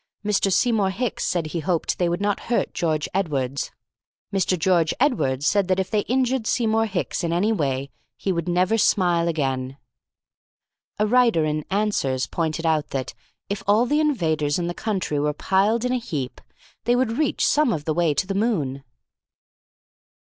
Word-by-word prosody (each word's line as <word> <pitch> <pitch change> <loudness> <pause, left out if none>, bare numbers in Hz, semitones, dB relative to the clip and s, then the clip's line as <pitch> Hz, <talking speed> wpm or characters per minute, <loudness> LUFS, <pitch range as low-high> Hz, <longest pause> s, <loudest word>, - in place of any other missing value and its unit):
Mr. 200 -1 +2
Seymour 215 -1 +2
Hicks 225 +4 -2
said 175 -3 0
he 160 +2 -3
hoped 170 +1 -1
they 175 -1 +2
would 175 +3 -2
not 205 -1 0
hurt 240 - 0
George 155 -3 -1
Edwardes. 140 -8 -1 0.6
Mr. 190 -1 +1
George 170 -1 +2
Edwardes 145 - +1
said 200 0 +2
that 185 0 +1
if 190 -1 -2
they 215 - +2
injured 255 -2 +1
Seymour 225 -2 +1
Hicks 190 -2 -2
in 170 - -1
any 185 +6 +2
way 140 -8 -1 0.3
he 195 - -1
would 170 -1 -2
never 185 +6 +2
smile 175 -4 +2
again. 135 -4 -2 1.2
A 210 - +2
writer 230 -7 +3
in 155 0 -1
Answers 190 -11 0
pointed 165 0 -2
out 155 -2 +1
that, 130 -2 -4 0.3
if 200 0 -3
all 215 +4 +4
the 295 +5 +1
invaders 160 - +1
in 175 - -2
the 175 - -2
country 190 -8 -2
were 150 +1 0
piled 200 +9 +1
in 250 - 0
a 255 - +1
heap, 145 - -5 0.4
they 240 +1 +3
would 245 -1 0
reach 305 - +1
some 295 -4 +3
of 150 -3 -3
the 155 - 0
way 165 -2 +1
to 140 - +1
the 195 - -3
moon. 160 - -1
185 Hz, 175 wpm, -23 LUFS, 155-220 Hz, 1.2 s, all